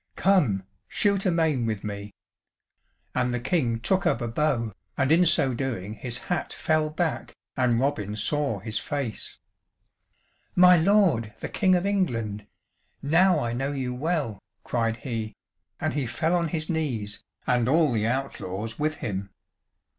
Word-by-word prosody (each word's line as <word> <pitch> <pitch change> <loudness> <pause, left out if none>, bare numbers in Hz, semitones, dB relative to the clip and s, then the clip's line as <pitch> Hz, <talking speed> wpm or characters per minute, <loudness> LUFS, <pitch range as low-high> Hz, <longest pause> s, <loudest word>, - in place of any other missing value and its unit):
"Come, 145 - +3 0.2
shoot 200 -1 +1
a - - +3
main 155 -8 +1
with 110 -3 -2
me." 100 0 -5 1.0
And 125 - +1
the 120 - -1
King 120 -4 0
took 190 +9 +1
up 120 - +2
a 120 - -2
bow, 115 -3 0 0.2
and 135 +1 +2
in 175 +2 +5
so 135 -4 +3
doing 115 -6 -3
his 120 +1 -5
hat 175 -2 -2
fell 155 -1 +1
back 160 +1 -2 0.2
and 125 -3 +2
Robin 105 -7 -1
saw 135 +3 0
his 105 +2 -3
face. 140 -7 -4 1.2
"My 180 0 +8
lord 165 - +3
the - - -4
King 185 -3 +3
of 180 +1 0
England, 115 - -1 0.6
now 165 +3 +4
I 115 - -2
know 135 +4 -2
you 130 -3 -2
well," 135 - -1 0.2
cried 115 -2 0
he, 115 -3 -4 0.4
and - - -1
he 140 -4 -1
fell 160 +8 0
on 170 -1 +1
his 155 -1 -3
knees 120 - -2 0.2
and 125 0 +2
all 155 -1 +4
the 110 -2 +1
outlaws 115 -4 -3
with 155 +1 0
him. 100 -2 -3
135 Hz, 155 wpm, -26 LUFS, 115-160 Hz, 1.2 s, My